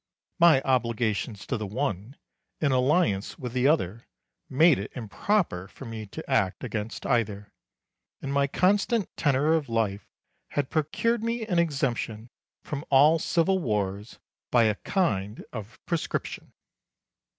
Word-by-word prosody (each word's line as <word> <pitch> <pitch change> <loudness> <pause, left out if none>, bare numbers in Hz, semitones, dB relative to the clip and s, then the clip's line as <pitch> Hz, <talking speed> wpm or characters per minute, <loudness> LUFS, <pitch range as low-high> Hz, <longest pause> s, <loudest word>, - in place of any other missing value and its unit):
My 165 -6 +6
obligations 115 -4 0
to 125 - -2
the 105 -1 -4
one 110 +1 -3 0.4
and 140 -4 +2
alliance 125 - +1
with 125 -5 -6
the 130 +1 +2
other 115 - 0 0.4
made 155 - +5
it 100 - -6
improper 120 - -1
for 135 - -12
me 110 -2 -6
to 160 +11 -9
act 115 -7 +1
against 110 -3 -4
either, 105 -5 -1 0.7
and 140 0 -4
my 140 0 +2
constant 200 - +1
tenor 145 +1 +2
of 155 -5 0
life 105 -4 -1 0.4
had 145 -2 -2
procured 210 +9 0
me 230 0 -1
an 180 -5 +1
exemption 125 -8 -1 0.3
from 145 -1 -5
all 150 +4 +6
civil 175 +4 +2
wars 105 - -2 0.3
by 120 -2 +4
a 110 -1 +3
kind 105 - -1
of 110 -1 -7
prescription. 170 -2 -3
130 Hz, 135 wpm, -27 LUFS, 110-160 Hz, 0.7 s, My